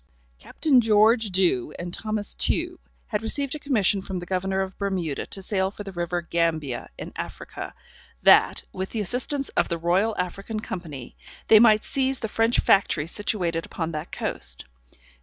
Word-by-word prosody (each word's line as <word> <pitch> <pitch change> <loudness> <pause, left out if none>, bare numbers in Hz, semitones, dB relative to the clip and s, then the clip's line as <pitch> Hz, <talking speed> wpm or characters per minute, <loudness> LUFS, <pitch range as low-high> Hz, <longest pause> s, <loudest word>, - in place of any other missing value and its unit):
Captain 265 - +3
George 220 0 +4
Dew, 175 -8 +1
and 175 0 -6
Thomas 215 0 -1
Tew, - - +1 0.3
had 210 -2 -2
received 275 +5 -2
a 305 - -4
commission 210 -9 +2
from 190 0 -5
the 175 - -5
Governor 190 +1 -1
of 190 0 -4
Bermuda 185 -7 -2
to 195 - -7
sail 190 -1 0
for 205 +1 -9
the 195 - -7
river 175 -1 -2
Gambia, 160 -7 -1
in - - -8
Africa, - - -7 0.5
that, - - +5
with 190 +1 -4
the 225 - -4
assistance 260 +7 -1
of - - 0
the 170 - -1
Royal 185 +6 +1
African 195 +4 -3
Company, 160 - -7 0.3
they 220 - +9
might 215 -1 +6
seize 265 -1 0
the 220 - -2
French 225 +2 +1
Factory 180 -6 +3
situated 170 -3 -1
upon 165 -1 -4
that 155 +1 -6
coast. - - -4
195 Hz, 165 wpm, -25 LUFS, 175-220 Hz, 0.5 s, they